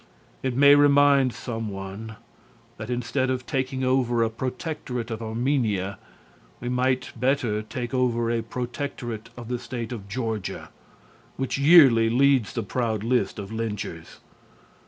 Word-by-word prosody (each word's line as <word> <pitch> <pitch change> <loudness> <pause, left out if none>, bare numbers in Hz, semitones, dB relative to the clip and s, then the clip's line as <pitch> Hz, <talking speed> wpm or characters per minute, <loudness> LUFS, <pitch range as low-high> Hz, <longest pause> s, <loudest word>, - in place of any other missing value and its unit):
It 130 -2 -2
may 140 +1 +8
remind 145 -2 +5
some 115 -2 -5
one 100 +3 -7 0.6
that 110 +2 -7
instead 125 +2 -1
of 130 0 -2
taking 130 -1 -2
over 125 -2 +2
a 110 - 0
protectorate 125 -1 -4
of 110 0 -4
Armenia 110 -5 -1 0.6
we 120 - -4
might 125 +1 0
better 125 -3 0
take 120 +3 -6
over 120 -2 +1
a 115 -1 0
protectorate 120 -1 -5
of 120 -2 -8
the 125 0 -2
State 120 -2 -6
of 100 -5 -7
Georgia, 110 -3 -4 0.7
which 135 0 -2
yearly 140 -7 +7
leads 130 -2 +3
the 115 - -2
proud 110 0 -2
list 115 -4 0
of 100 0 -7
lynchers. 105 -7 -5
120 Hz, 135 wpm, -25 LUFS, 110-130 Hz, 0.7 s, may